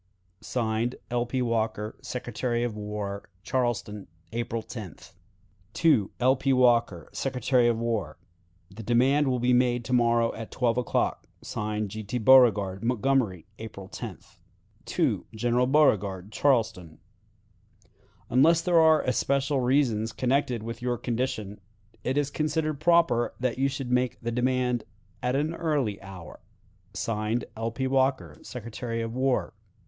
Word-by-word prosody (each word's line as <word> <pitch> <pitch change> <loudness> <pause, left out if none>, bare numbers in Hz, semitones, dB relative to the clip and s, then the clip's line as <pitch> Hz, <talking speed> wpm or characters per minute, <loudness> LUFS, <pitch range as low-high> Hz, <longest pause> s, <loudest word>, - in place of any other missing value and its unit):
(Signed) 115 0 -1 0.2
"L. 120 0 0
P. 130 +1 -1
Walker, 110 -2 -1
Secretary 120 -1 -3
of 120 -3 -2
War." 105 -1 -5
"Charleston, 115 -3 -2 0.2
April 115 0 -3
10th. 105 - -9 1.1
"L. 130 +2 +4
P. 135 +1 0
Walker, 120 -9 +3
Secretary 125 -2 +1
of 120 -1 +2
War. 110 -9 -2 0.5
"The 105 +4 -9
demand 130 +6 +3
will 130 -1 +1
be 125 +1 +2
made 125 -1 +2
to 125 - -3
morrow 120 -1 +3
at 115 -1 -7
twelve 120 -1 0
o'clock. 125 - -1 0.2
(Signed) 105 -1 -3
"G. 110 +1 -5
T. 105 +5 -3
Beauregard." 105 -6 +5
"Montgomery, 120 - +1
April 100 -4 -8
10th. - - -9 1.0
"General 120 +3 +1
Beauregard, 105 -9 +2
Charleston. 110 - 0 1.3
"Unless 155 +7 +4
there 170 -1 +4
are 160 -1 +5
especial 140 +2 +1
reasons 120 -4 +1
connected 125 -3 0
with 115 +1 -6
your 125 0 0
own 120 - -6
condition, 110 -4 -3 0.4
it 130 +2 -1
is 145 -1 0
considered 155 -1 -1
proper 165 -7 +3
that 125 0 -1
you 135 - +3
should 135 -2 -4
make 125 0 +1
the 120 - -3
demand 125 0 0 0.4
at 125 +1 0
an 150 +4 0
early 145 - -1
hour. 95 -4 -10 0.6
(Signed) 110 +1 -1
"L. 115 +1 -2
P. 130 +4 -3
Walker, 130 0 0
Secretary 115 -1 -5
of 115 0 -5
War." 130 +1 0
120 Hz, 135 wpm, -27 LUFS, 110-130 Hz, 1.3 s, Beauregard